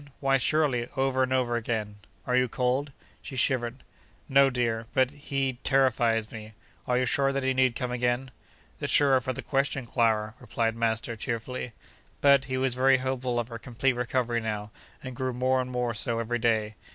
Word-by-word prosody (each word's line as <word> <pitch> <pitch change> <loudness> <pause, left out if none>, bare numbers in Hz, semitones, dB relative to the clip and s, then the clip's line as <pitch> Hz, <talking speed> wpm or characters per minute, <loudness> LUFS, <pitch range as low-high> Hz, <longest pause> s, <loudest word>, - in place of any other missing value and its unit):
Why, 135 -1 +3
surely, 130 -4 +1
over 135 0 +1
and 130 0 +1
over 125 -2 +1
again! 110 -3 -3 0.3
Are 125 - 0
you 125 0 +3
cold?' 130 +4 -1 0.3
(she 135 - -8
shivered). 125 0 -1 0.4
'No, 140 0 +5
dear—but—he 130 +2 -1
terrifies 120 -5 +2
me: 110 -1 -9 0.3
are 125 - +2
you 130 - +2
sure 135 +2 +2
that 135 0 -2
he 130 0 +1
need 130 -2 +2
come 125 -1 -3
again?' 125 +1 -1 0.5
'The - - -2
surer 135 -3 +5
for 130 +1 -2
the 125 - -6
question, 135 -1 -1
Clara!' 110 -3 +1
replied 115 -2 -1
master, 115 +1 -1
cheerfully. 115 +1 -4 0.5
But, 140 -1 +5
he 130 0 -3
was 130 -1 +1
very 130 +1 +4
hopeful 130 -1 -2
of 120 0 -3
her 115 -1 -7
complete 130 +2 0
recovery 120 -1 -1
now, 105 -1 -4 0.3
and 130 -1 -7
grew 130 0 -2
more 130 +1 +1
and 125 - -5
more 125 -1 -1
so 110 +2 -1
every 120 +1 -1
day. 110 -2 +1
125 Hz, 175 wpm, -27 LUFS, 115-130 Hz, 0.5 s, No